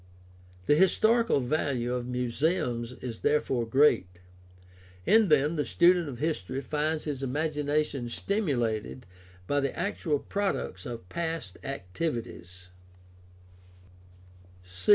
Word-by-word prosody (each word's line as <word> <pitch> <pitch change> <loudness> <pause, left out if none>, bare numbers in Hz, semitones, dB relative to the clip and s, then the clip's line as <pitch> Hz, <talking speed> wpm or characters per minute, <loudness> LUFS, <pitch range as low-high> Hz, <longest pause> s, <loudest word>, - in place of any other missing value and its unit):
The - - +4
historical 220 +5 +4
value 125 -2 -1
of 125 -1 -3
muse 125 0 -3
ums 125 -9 0
is 120 -3 -5
therefore 135 -5 +1
great. 110 -9 +3 0.9
In 220 -1 +5
them 150 +2 +3
the 150 - +1
student 175 -1 +3
of 125 - -7
history 135 - -2
finds 150 +3 -1
his 145 -4 -4
imagination 145 -2 -1
stimulated 125 - -1 0.4
by 145 +9 +1
the 140 -2 -2
actual 170 -4 -1
products 200 -3 -3
of 115 -7 -7
past 165 - -4
activities. 95 - -5
145 Hz, 105 wpm, -28 LUFS, 120-160 Hz, 0.9 s, In